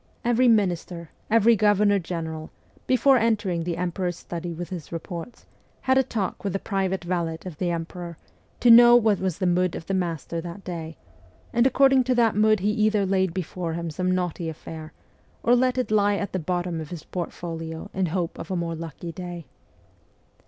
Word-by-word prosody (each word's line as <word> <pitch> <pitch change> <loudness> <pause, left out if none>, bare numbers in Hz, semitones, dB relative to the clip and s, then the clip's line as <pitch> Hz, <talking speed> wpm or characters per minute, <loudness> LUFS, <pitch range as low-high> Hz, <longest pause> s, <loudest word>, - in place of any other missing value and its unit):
Every 240 +1 +3
minister, 180 -6 +1 0.2
every 230 +1 +5
governor 205 -1 +3
general, 160 -2 -5 0.4
before 265 +1 +5
entering 210 -7 +1
the 170 0 -3
emperor's 175 0 -2
sturdy 170 0 -6
with 170 +1 -6
his 175 -5 -7
reports, 170 +5 -7 0.4
had 260 - +2
a 265 - +6
talk 220 -7 -3
with 200 -3 -2
the - - +1
private 190 -2 -2
valet 170 -2 -2
of 170 -5 -8
the 180 - 0
emperor, 170 0 -5 0.4
to 240 - +7
know 240 +1 +9
what 220 -4 +4
was 185 -3 -2
the 190 - -1
mood 180 0 +2
of - - -7
the 195 - -3
master 170 -2 -2
that 175 +3 -8
day; 165 -3 -6 0.6
and 235 +2 +4
according 270 -1 +4
to 255 0 +1
that 230 -3 +3
mood 215 -1 +3
he 205 +2 +2
either 215 -1 +2
laid 190 -1 +1
before 175 -1 -4
him 170 0 -4
some 185 +4 -1
knotty 180 -2 -1
affair, 160 0 -8 0.5
or 240 - +5
let 255 +1 +2
it 255 -3 -1
lie 205 -1 +3
at 200 -1 -4
the 185 - 0
bottom 175 0 -2
of 155 - -8
his 170 -3 -7
portfolio 165 -2 -6
in 190 -1 0
hope 170 0 -3
of - - -7
a 190 - -1
more 170 -1 -2
lucky 165 +1 -7
day. 175 -2 -7
180 Hz, 190 wpm, -25 LUFS, 170-210 Hz, 0.6 s, know